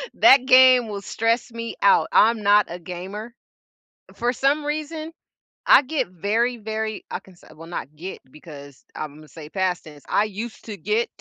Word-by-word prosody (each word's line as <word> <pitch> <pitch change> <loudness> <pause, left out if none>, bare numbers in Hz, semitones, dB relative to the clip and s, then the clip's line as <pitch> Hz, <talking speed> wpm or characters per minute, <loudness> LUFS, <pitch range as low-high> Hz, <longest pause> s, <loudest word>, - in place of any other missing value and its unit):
That 270 -6 +6
game 255 -2 +6
will 200 -1 -5
stress 230 +4 -1
me 230 0 -6
out, 200 - +4
I'm 220 0 +4
not 205 +1 +4
a 175 - -6
gamer. 190 +7 -8 0.8
For 240 +1 -1
some 285 +4 +1
reason, 310 +1 -4 0.5
I - - +7
get 290 +3 -2
very, 220 +7 -1
very 220 0 -4
I - - -4
can 190 - -19
say - - -20
well, 165 +1 -12
not 155 -3 -7
get 180 +5 -8
because 145 -2 -13
Imma 155 +1 -8
say 150 +1 -11
past 185 -1 -1
tense. 150 -2 -14
I 210 - +2
used 215 +2 -7
to 210 -3 -7
get 210 +7 -1
215 Hz, 170 wpm, -23 LUFS, 175-240 Hz, 0.8 s, I